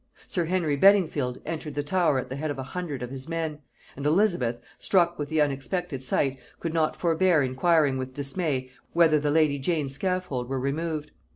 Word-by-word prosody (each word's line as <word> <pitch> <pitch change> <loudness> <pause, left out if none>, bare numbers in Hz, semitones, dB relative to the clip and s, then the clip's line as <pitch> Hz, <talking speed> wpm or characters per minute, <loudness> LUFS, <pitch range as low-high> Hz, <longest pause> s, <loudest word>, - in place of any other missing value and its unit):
Sir 175 -3 -1
Henry 165 -4 +1
Beddingfield 155 -8 +3
entered 155 -2 -5
the 145 - -1
Tower 165 -2 +2
at 130 - -2
the 130 - -5
head 155 +2 -3
of 145 - -3
a 130 - -4
hundred 145 -3 -5
of 125 - -6
his 135 +3 -7
men; 160 -2 -3 0.4
and 140 - -7
Elizabeth, 150 - +2 0.2
struck 175 -3 +2
with 145 -1 -3
the 160 - 0
unexpected 145 +1 -1
sight, 130 +1 0 0.2
could 165 -1 -3
not 160 -2 +1
forbear 170 -2 +3
inquiring 135 +1 +2
with 130 0 -5
dismay, 140 -3 -2 0.2
whether 165 -3 +5
the 145 0 0
lady 150 -2 +3
Jane's 145 -2 -1
scaffold 180 -7 -2
were 135 -1 -1
removed? 150 +3 -2
150 Hz, 185 wpm, -26 LUFS, 135-170 Hz, 0.4 s, whether